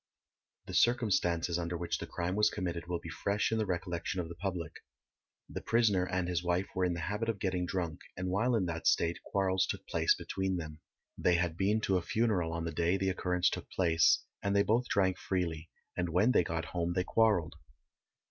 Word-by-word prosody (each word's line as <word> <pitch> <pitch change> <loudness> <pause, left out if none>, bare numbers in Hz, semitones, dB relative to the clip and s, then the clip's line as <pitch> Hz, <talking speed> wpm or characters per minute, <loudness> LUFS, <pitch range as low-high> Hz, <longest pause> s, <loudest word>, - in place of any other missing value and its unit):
The - - -8
circumstances 90 -8 +2
under 85 0 -3
which 85 0 -2
the - - -6
crime 90 +1 -2
was 105 0 +4
committed 85 -3 -4
will 90 0 -1
be 80 - -9
fresh 100 +6 0
in 110 - +1
the 110 - 0
recollection 90 0 -2
of 85 -2 -3
the - - -6
public. 90 -3 -4 0.7
The - - -6
prisoner 105 -6 +2
and 90 -1 -1
his 90 -1 -1
wife 90 +2 +1
were 95 - 0
in 90 - 0
the 85 - -4
habit 105 +7 -2
of 115 - -1
getting 90 -2 -1
drunk, 85 -3 -2 0.2
and 90 0 -3
while 115 +6 +2
in 100 -5 +1
that 85 -1 -2
state 85 0 +2
quarrels 95 -1 +1
took - - -4
place - - +2
between 95 -1 -2
them. 75 -2 -7 0.4
They 90 - +3
had 85 -2 0
been 100 +5 +1
to 95 -3 +2
a - - -1
funeral 95 -2 0
on 85 0 -3
the 85 - -2
day 85 +3 +1
the 95 0 0
occurrence 90 -1 +1
took - - -5
place, 80 -4 +3 0.2
and 100 0 0
they 100 - +5
both 120 +4 +1
drank 95 -2 +2
freely, 85 -4 -2 0.3
and 90 -1 -1
when 95 +9 +3
they 90 - +4
got 80 0 -3
home 85 -1 -1
they 90 0 +1
quarrelled. 100 -5 +2
90 Hz, 210 wpm, -32 LUFS, 85-100 Hz, 0.7 s, they